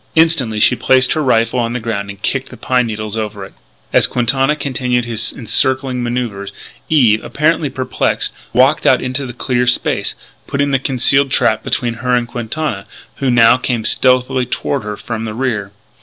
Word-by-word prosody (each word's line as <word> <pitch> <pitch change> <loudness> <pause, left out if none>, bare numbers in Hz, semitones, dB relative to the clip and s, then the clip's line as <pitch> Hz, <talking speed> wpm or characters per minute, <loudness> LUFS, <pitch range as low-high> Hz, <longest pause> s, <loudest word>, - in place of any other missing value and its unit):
Instantly 160 -10 +2
she 125 - +4
placed 130 0 +3
her 155 - -1
rifle 115 -2 +1
on 115 0 -1
the 125 - -2
ground 110 -3 -4
and 100 -1 -9
kicked 135 0 -1
the - - -12
pine 125 -2 0
needles 110 -1 -5
over 105 -3 -4
it. - - -15 0.4
As - - +5
Quintana 135 +4 +1
continued 125 -4 -1
his 115 -1 -1
encircling 130 +1 +1
manoeuvres 120 -5 -3 0.4
Eve, 120 -9 +3
apparently - - 0
perplexed, - - -2 0.2
walked 135 +4 +3
out 130 - +5
into 130 +2 -3
the - - -6
clear 125 0 -1
space, 125 - 0 0.3
putting 140 0 -1
the 135 - +2
concealed 135 +1 +2
trap 120 -4 +1
between 120 -2 -1
her 125 0 +1
and 120 -1 0
Quintana, 120 -3 -4 0.3
who 135 - -1
now 120 0 +5
came 120 -3 -2
stealthily 130 0 +2
toward 140 +2 -2
her 105 -1 -6
from 115 -1 -5
the 110 -1 -5
rear. 115 -6 -2
125 Hz, 175 wpm, -16 LUFS, 115-130 Hz, 0.4 s, As